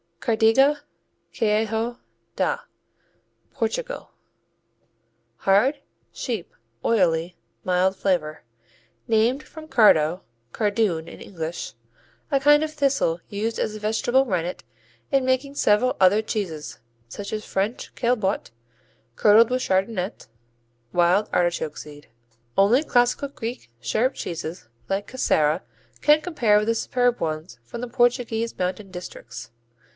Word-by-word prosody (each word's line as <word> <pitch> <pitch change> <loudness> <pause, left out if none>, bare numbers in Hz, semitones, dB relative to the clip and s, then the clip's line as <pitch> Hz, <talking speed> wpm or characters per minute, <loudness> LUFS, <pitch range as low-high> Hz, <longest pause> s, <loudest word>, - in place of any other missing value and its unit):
Cardiga, 245 +6 +3 0.5
Queijo 225 +1 0 0.4
da - - 0 0.9
Portugal - - -3 1.3
Hard; 215 +10 +3 0.3
sheep; 225 -9 -4 0.3
oily; 175 -5 +2 0.3
mild 185 +1 +2
flavor. 175 -6 -1 0.6
Named 230 +5 +2
from 315 -1 -12
cardo, 180 - +4 0.3
cardoon 205 -6 0
in - - -11
English, 165 - -5 0.6
a 275 - +3
kind 295 +2 +5
of 310 - -3
thistle 275 - +1
used 215 +3 -2
as 215 - -1
a - - -7
vegetable 225 +5 +2
rennet 180 -5 -2 0.5
in 270 -1 +2
making 260 +2 0
several 235 +1 +3
other 190 +3 +5
cheeses, 180 -9 -4 0.3
such 200 +12 -7
as 215 0 -3
French 200 +5 -2
Caillebottes 215 - 0 0.6
curdled 220 +2 +6
with 255 0 +1
chardonnette, 190 0 -1 0.7
wild 180 +4 +3
artichoke 175 -3 0
seed. 145 -3 -11 0.5
Only 225 +9 +5
classical 245 0 +2
Greek 230 - -7
sheep 215 - 0
cheeses 165 -5 -6 0.2
like 195 +1 -1
Casera 155 -11 +2 0.4
can 300 +1 +5
compare 240 -12 +2
with 210 +1 0
the 230 - +2
superb 245 +1 +1
ones 155 -5 -4
from 120 - -8
the 250 - -3
Portuguese 240 -2 0
mountain 185 +2 -3
districts. 180 -10 -9
215 Hz, 115 wpm, -24 LUFS, 180-245 Hz, 1.3 s, curdled